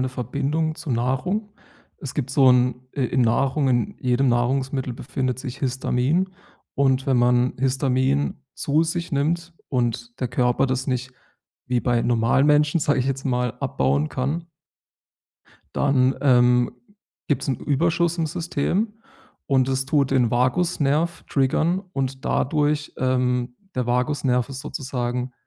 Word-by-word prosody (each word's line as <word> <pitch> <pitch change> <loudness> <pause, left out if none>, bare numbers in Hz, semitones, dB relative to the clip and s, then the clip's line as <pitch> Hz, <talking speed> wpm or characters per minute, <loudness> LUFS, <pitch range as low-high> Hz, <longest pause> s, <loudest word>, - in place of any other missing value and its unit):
'ne - - -2
Verbindung 140 +6 -2
zu 155 -2 -7
Nahrung. 130 - -1 0.5
Es 140 - -7
gibt 135 -3 -2
so 130 -1 +5
'n 125 0 +4 0.2
i - - -1
in 130 +1 0
Nahrung 135 +5 +2
in 120 -4 +1
jedem 125 +1 +2
Nahrungsmittel 130 +2 0
befindet 130 0 -3
sich 130 +1 -6
Histamin. 135 +6 0 0.4
Und 135 -1 +2
wenn 130 -2 +3
man 125 +1 +3
Histamin 135 +1 +1 0.2
zu 150 +3 +1
sich 165 0 -3
nimmt 165 +4 0 0.2
und 120 -1 -2
der 125 - -1
Körper 125 +2 +1
das 130 0 -2
nicht 130 -1 -2 0.5
wie 125 -1 +1
bei 120 -1 +1
normalen 120 +3 +2
Menschen, 150 +2 +3
sage 145 -2 +1
ich 125 - -1
jetzt 135 0 -2
mal, 125 -2 0
abbauen 70 +3 0
kann 150 +6 -3 1.3
dann 135 -2 +2
ähm 125 -2 +4 0.6
gibt 140 -3 +1
es - - -5
'n 130 - +1
Überschuss 170 +3 +1
im 160 - +1
System 175 +6 -1 0.5
und 130 -2 +2
es 130 0 0
tut 140 -1 +2
den 125 -4 +3
Vagusnerv 145 +5 +1
triggern 155 +6 +1
und 135 -2 -3
dadurch, 150 +1 0
ähm 125 -1 0 0.2
der 125 -2 -1
Vagusnerv 125 0 +1
ist 135 -1 -6
sozusagen 125 -4 -3
130 Hz, 140 wpm, -23 LUFS, 125-145 Hz, 1.3 s, so